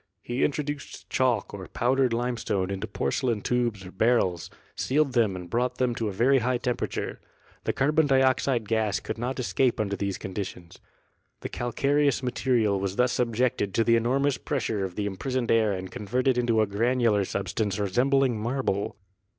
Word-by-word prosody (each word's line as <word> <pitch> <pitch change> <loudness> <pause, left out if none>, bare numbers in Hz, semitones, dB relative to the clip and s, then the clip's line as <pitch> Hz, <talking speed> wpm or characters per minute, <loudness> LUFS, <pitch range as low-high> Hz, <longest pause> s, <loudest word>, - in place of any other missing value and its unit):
He 120 +2 -1
introduced 145 0 -3
chalk 130 -2 +1
or 95 -2 -7
powdered 130 +1 +1
limestone 115 -5 -1
into 95 -1 -3
porcelain 115 - -1
tubes 120 -5 -1
or 90 - -9
barrels, 95 -5 +1 0.3
sealed 140 0 +1
them 110 -6 +2
and 90 -1 -7
brought 120 +6 -1
them 125 -2 +1
to 115 -1 -2
a - - -2
very 130 +7 +3
high 125 +1 +1
temperature. 125 0 -3 0.4
The - - +1
carbon 150 +3 +2
dioxide 130 -3 +2
gas 110 -2 +1
could - - -6
not 125 +3 -3
escape 125 0 +1
under 100 -2 0
these 100 -1 -2
con 95 - -7
ditions. 90 -3 -6 0.6
The - - -4
calcareous 140 +3 +1
material 120 -5 +1
was 95 0 -2
thus 125 +2 +2
subjected 120 -4 0
to 115 - +3
the 115 +1 +4
enormous 130 +4 +1
pressure 115 -8 -2
of 95 -2 -4
the 105 - -2
imprisoned 120 +5 -2
air 110 -2 +3
and 95 -1 -4
con 105 - -7
verted 130 +3 +2
into 120 -2 +2
a - - +3
granular 115 0 +2
substance 100 +1 -2
resembling 125 +4 +2
marble. 115 -5 -1
120 Hz, 170 wpm, -27 LUFS, 100-130 Hz, 0.6 s, the